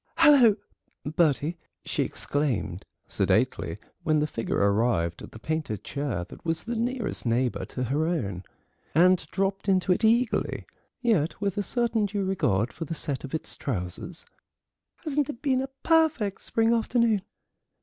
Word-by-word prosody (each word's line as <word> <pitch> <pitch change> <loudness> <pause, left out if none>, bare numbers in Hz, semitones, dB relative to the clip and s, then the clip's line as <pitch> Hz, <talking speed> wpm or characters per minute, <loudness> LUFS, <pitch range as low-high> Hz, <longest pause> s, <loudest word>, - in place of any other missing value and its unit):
"Hullo, 280 -10 +7 0.5
Bertie!" 155 +1 +1 0.3
she - - -1
exclaimed 120 - -2 0.2
sedately, - - +1 0.2
when 155 -3 +2
the 150 - +2
figure 115 -6 -2
arrived 100 -5 +1
at - - -10
the - - -10
painted 150 - -3
chair 135 -11 -3
that - - -12
was 165 -1 -1
the 240 +1 -3
nearest 235 -1 -2
neighbour 120 +1 0
to 125 - -4
her 145 +6 0
own, 100 - -2 0.5
and 180 +3 +6
dropped 195 +1 -1
into 185 -1 +3
it 180 - +2
eagerly, 230 +2 +2 0.4
yet 185 -10 +1
with 200 -2 -1
a 205 - 0
certain 225 -1 +1
due 200 -1 -2
regard 120 - +1
for 165 +2 -5
the 165 - -4
set 140 -3 -2
of 140 +2 -4
its 160 - -3
trousers; 120 - -4 0.8
"hasn't 295 -1 0
it 265 -2 -7
been 260 -3 +2
a 265 - -3 0.2
perfect 315 - +2
spring 225 +1 +2
afternoon?" 230 -2 +2
170 Hz, 150 wpm, -27 LUFS, -, 0.8 s, Hullo